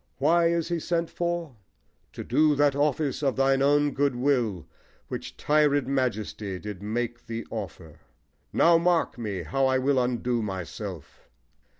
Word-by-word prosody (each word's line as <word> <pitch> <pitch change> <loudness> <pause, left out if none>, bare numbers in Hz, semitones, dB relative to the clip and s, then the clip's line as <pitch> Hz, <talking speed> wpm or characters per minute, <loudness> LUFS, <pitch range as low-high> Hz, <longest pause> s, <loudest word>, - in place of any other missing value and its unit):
Why 165 +4 +3
is 170 0 0
he 170 -1 -1
sent 170 0 -1
for? 170 -6 -3 0.6
To - - -6
do 150 +4 +3
that 145 -1 +3
office 145 -1 0
of 135 -3 +1
thine 135 0 +2
own 145 +1 +3
good 140 -1 0
will 120 - 0 0.4
Which - - -6
tired 145 -2 +2
majesty 110 -7 -2
did 105 -1 -7
make 120 +3 -3
thee 115 0 -5
offer. 90 -7 -7 0.5
Now 170 0 +5
mark 170 -6 +1
me! 100 -6 -3
how 130 - +1
I 130 0 +2
will 130 0 +2
undo 125 -1 -1
myself. 95 -3 -7
135 Hz, 150 wpm, -26 LUFS, 110-150 Hz, 0.6 s, Now